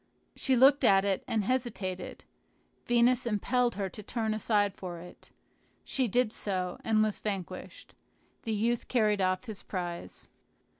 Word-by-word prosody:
She 265 - +2
looked 270 +3 +6
at 195 -4 +5
it, 195 -2 0
and 220 -2 0
hesitated; 210 -6 -3 0.6
Venus 240 +1 +3
impelled 240 +3 +1
her 200 -1 -2
to 210 - -9
turn 220 +1 -2
aside 205 -2 +1
for 180 -3 -7
it. 175 +1 -13 0.5
She 260 -2 0
did 235 +1 +1
so, 185 -3 -2
and 215 -1 +3
was 215 -1 -1
vanquished. 195 -4 -6 0.5
The 225 - -4
youth 230 +3 0
carried 215 -5 +2
off 185 +2 +1
his 220 -5 -8
prize. 175 -3 -6
215 Hz, 145 wpm, -30 LUFS, 195-240 Hz, 0.6 s, looked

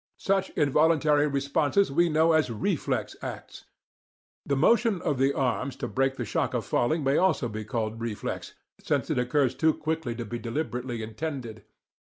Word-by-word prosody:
Such 195 -1 0
involuntary 150 -1 +3
responses 145 +6 +1
we 170 +4 +3
know 160 +1 +3
as 155 -4 +3
'reflex' 110 -3 -2
acts. - - -8 0.8
The 140 - +1
motion 225 - +3
of 145 -4 0
the 135 +1 +3
arms 135 0 -1
to - - -4
break 135 0 0
the 120 - -4
shock - - -1
of - - -2
falling 155 +6 +1
may 135 +1 +2
also 185 -9 +2
be 110 -1 -5
called 115 0 -3
reflex, 115 -3 -4 0.3
since - - 0
it - - +1
occurs 125 +1 +1
too 160 -1 +2
quickly 155 -6 -3
to 120 0 -5
be 120 +2 -5
deliberately 120 -1 -3
intended. 115 -1 -6
140 Hz, 165 wpm, -27 LUFS, 120-160 Hz, 0.8 s, involuntary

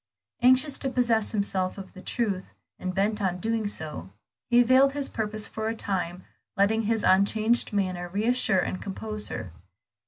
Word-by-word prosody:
Anxious 260 +3 +4
to 270 - +2
possess 235 -4 +1
himself 195 -3 -1
of 195 -1 -9
the 185 - -11
truth, 200 -4 -3 0.2
and 185 -1 -4
bent 210 +2 0
on 185 -2 0
doing 220 +2 -1
so, 155 - -3 0.4
he 240 0 +6
veiled 260 +3 +4
his 285 -1 -1
purpose 215 -1 -1
for 220 0 -4
a 225 - -2
time, 180 -4 -3 0.3
letting 210 +3 +3
his 225 0 0
unchanged 215 +5 +3
manner 185 -3 -2
reassure 215 +2 +2
and 185 0 -1
compose 215 +2 -4
her. 110 -7 -6
210 Hz, 160 wpm, -26 LUFS, 185-230 Hz, 0.4 s, he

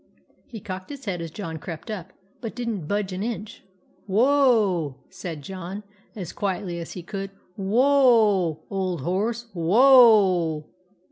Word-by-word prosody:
He 225 - -8
cocked 185 -1 -7
his 280 -3 -9
head 180 -5 -3
as 165 - -5
John 160 -2 -6
crept 165 +6 -7
up, 190 -3 -6 0.3
but 225 - -6
did 245 -1 -4
n't 200 -10 -3
budge 200 0 -1
an 185 - -4
inch. 220 -1 -5 0.2
" - - -35
Whoa! 215 - +3
" - - -35
said 175 -5 -7
John, 190 +4 -7 0.3
as 185 -6 -6
quietly 190 -3 -3
as 165 - -7
he 180 - -7
could. 195 +2 -5 0.2
" 180 - -37
Who 195 -1 -4
o 225 - +4
a, - - -11
old 185 -5 -2
horse, 215 - -1
who 170 -2 -3
o 205 - +6
a 185 +2 -37
195 Hz, 180 wpm, -24 LUFS, 175-225 Hz, 0.3 s, o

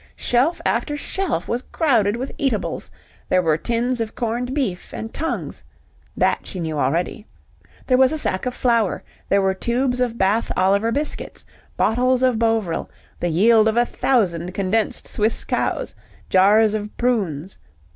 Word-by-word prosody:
Shelf 260 +8 +1
after 295 -1 0
shelf 325 - -2
was 240 - -1
crowded 230 -10 +2
with 260 +3 -4
eatables; 260 -7 -1 0.4
there 185 0 +3
were 160 -2 +3
tins 235 +7 -1
of 220 -1 -4
corned 240 +2 -2
beef 255 -11 -2
and 225 - -6
tongues 325 +2 -3 0.5
(that - - +1
she 185 - -6
knew 160 -3 -3
already), 170 - -1 0.6
there 255 -1 +3
was 260 -1 +5
a 315 - -1
sack 190 -6 0
of 250 - -3
flour, 230 -5 +1 0.3
there 200 0 +3
were 190 0 +2
tubes 245 +5 0
of 240 -2 0
Bath 205 +3 +1
Oliver 200 +4 +2
biscuits, 290 +4 -3 0.3
bottles 250 +3 +2
of 250 -3 +2
Bovril, 225 -7 0 0.3
the 175 - -1
yield 215 +6 +4
of 220 +1 +1
a 240 - +4
thousand 185 -10 0
condensed 205 +3 -1
Swiss 215 +1 0
cows, - - -1 0.4
jars 205 +3 +5
of 210 -1 -5
prunes. 195 - -1
225 Hz, 155 wpm, -21 LUFS, 190-250 Hz, 0.6 s, was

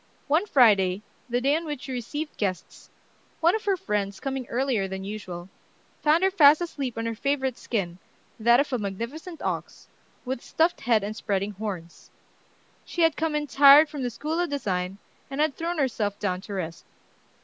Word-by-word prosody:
One 320 +8 +2
Friday, 205 - +4 0.3
the 240 +1 +1
day 280 +3 +3
on 330 - -1
which 295 -4 -5
she 270 - -6
received 290 +5 -4
guests, 190 -3 -4 0.5
one 340 +4 +4
of 440 - -4
her 395 -2 +2
friends, 205 - -2
coming 270 -2 -4
earlier 245 -5 0
than 190 0 -5
usual, 185 -4 -6 0.5
found 315 +4 +3
her 385 - +4
fast 300 -5 +7
asleep 280 -9 -4
on 225 - -2
her 230 - -1
favorite 265 +1 -1
skin, 185 -8 -3 0.4
that 235 +2 +5
of 280 -1 0
a 250 - +1
magnificent 235 - -6
ox, - - -4 0.4
with 255 -1 -3
stuffed 330 +2 +1
head 225 -4 +2
and 210 +2 -4
spreading 200 -2 -1
horns. 190 -5 -7 0.7
She 345 - -1
had 325 -2 +4
come 320 -1 -1
in 300 0 0
tired 285 +2 +7
from 295 -2 -6
the 250 - -1
School 310 +7 -3
of 350 -1 0
Design, 190 -9 -2 0.3
and 270 +1 -5
had 305 -2 +2
thrown 340 +1 -3
herself 220 -8 -1
down 185 -3 -2
to 205 - -8
rest. 165 -3 -5
250 Hz, 180 wpm, -26 LUFS, 205-300 Hz, 0.7 s, fast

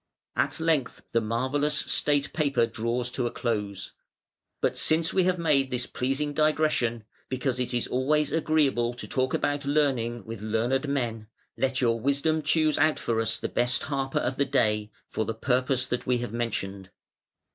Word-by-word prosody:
At - - 0
length 160 -5 0
the 115 - +2
marvellous 130 +7 0
state 145 -2 +1
paper 140 -6 +2
draws 120 +2 -2
to 125 -1 -1
a - - -4
close, 105 -4 -3 0.7
"But - - +1
since 160 +1 +2
we 185 -2 +3
have 185 0 +2
made 150 -5 +2
this 125 -1 -1
pleasing 135 +4 -1
digression 155 -7 +1 0.3
(because 130 -1 -1
it 125 - -1
is 120 -2 0
always 150 +3 +1
agreeable 145 -7 +1
to 120 - -7
talk 130 -1 0
about 145 -1 -1
learning 125 -7 +1
with 115 -2 -7
learned 120 +6 0
men) 115 -6 -2 0.3
let 135 0 0
your 115 -2 +2
Wisdom 140 +5 +1
choose 155 0 +2
out 155 -1 +3
for 115 -1 0
us 115 0 +1
the - - -3
best 120 +1 +1
harper 135 -2 -2
of 130 +1 -1
the 140 - +2
day, 105 -6 +1 0.2
for 110 - -2
the 110 +1 -3
purpose 130 +2 +1
that 125 - -3
we 125 -1 +3
have 120 -2 -5
mentioned. 100 -5 -3
130 Hz, 170 wpm, -27 LUFS, 115-145 Hz, 0.7 s, we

